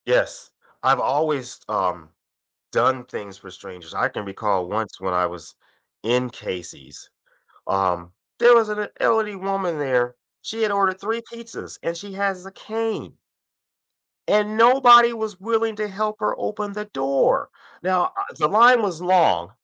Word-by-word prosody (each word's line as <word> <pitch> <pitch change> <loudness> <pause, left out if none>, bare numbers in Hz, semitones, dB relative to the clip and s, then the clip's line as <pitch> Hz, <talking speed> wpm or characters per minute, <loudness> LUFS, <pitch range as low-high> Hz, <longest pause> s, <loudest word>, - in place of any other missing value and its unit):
Yes, - - 0 0.3
I've - - +4
always, 140 -3 -1
um, - - -2 0.6
done 130 -1 +2
things 100 -5 -9
for 95 - -15
strangers. 90 -2 -13
I - - +1
can - - -7
recall 100 -2 -2
once 110 +1 -4
when 95 -1 -3
I 90 0 +2
was 85 -2 -10 0.5
in 125 +3 0
Casey's, 90 -5 -10 0.6
um, 90 -3 -1 0.3
there 240 +1 +7
was 230 -2 +4
an 210 0 -3
e - - -9
elderly 215 -3 +1
woman 190 -3 -2
there, 125 -3 0 0.2
she 225 +1 -5
had 215 -2 +1
ordered 195 -2 +1
3 225 +3 -3
pizzas 235 0 -10
and 170 - -3
she 200 +3 -10
has 195 -2 -2
a - - -9
cane 225 +2 -5 1.1
and 210 +1 +2
nobody 240 0 +8
was 220 -4 -5
willing 225 +1 0
to 210 0 -2
help 215 +2 -3
her 210 - -1
open 210 -1 -4
the 210 +1 -5
door. 135 -8 +1 0.3
Now, 185 -1 +2
uh, - - -4
the - - +2
line 235 +6 +6
was 180 -6 -3
long, 170 - +3
190 Hz, 155 wpm, -22 LUFS, -, 1.1 s, nobody